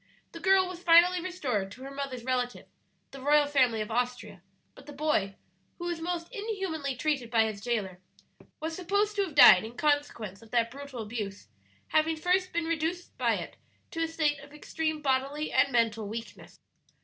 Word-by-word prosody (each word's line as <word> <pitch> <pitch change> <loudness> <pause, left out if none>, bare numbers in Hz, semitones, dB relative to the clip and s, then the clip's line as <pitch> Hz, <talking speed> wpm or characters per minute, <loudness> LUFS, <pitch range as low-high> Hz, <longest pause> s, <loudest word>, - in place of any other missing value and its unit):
The 335 - -9
girl 380 +2 +4
was 360 -1 -8
finally 350 +1 +6
restored 270 - -2
to 255 - -12
her 275 - -7
mother's 275 -3 -5
relatives, 250 -1 -2 0.4
the 275 - -10
royal 295 +2 +4
family 255 -6 +2
of 215 +1 -5
Austria; 245 -5 -3 0.3
but 275 - -16
the 295 - -9
boy, 275 -10 0 0.4
who 345 - -6
was 345 -2 -3
most 340 0 -3
inhumanly 385 - -3
treated 270 -3 -1
by 225 -1 +4
his 215 -2 -4
jailer, 200 -6 -2 0.6
was 320 +1 -4
supposed 405 +4 0
to - - +3
have 330 -7 -7
died 190 -9 +9
in 230 +3 -9
consequence 290 -10 -1
of 225 - -16
that 230 0 +1
brutal 275 -3 -7
abuse, 205 - -6 0.4
having 315 +1 +2
first 365 +3 +1
been 340 0 -1
reduced 335 +2 -3
by - - +2
it - - -7 0.3
to 330 - -4
a 330 - +1
state 305 -3 0
of 280 0 -14
extreme 310 0 -3
bodily 275 +3 0
and 275 - +3
mental 225 -3 +1
weakness. 225 +2 -8
285 Hz, 180 wpm, -29 LUFS, 235-330 Hz, 0.6 s, died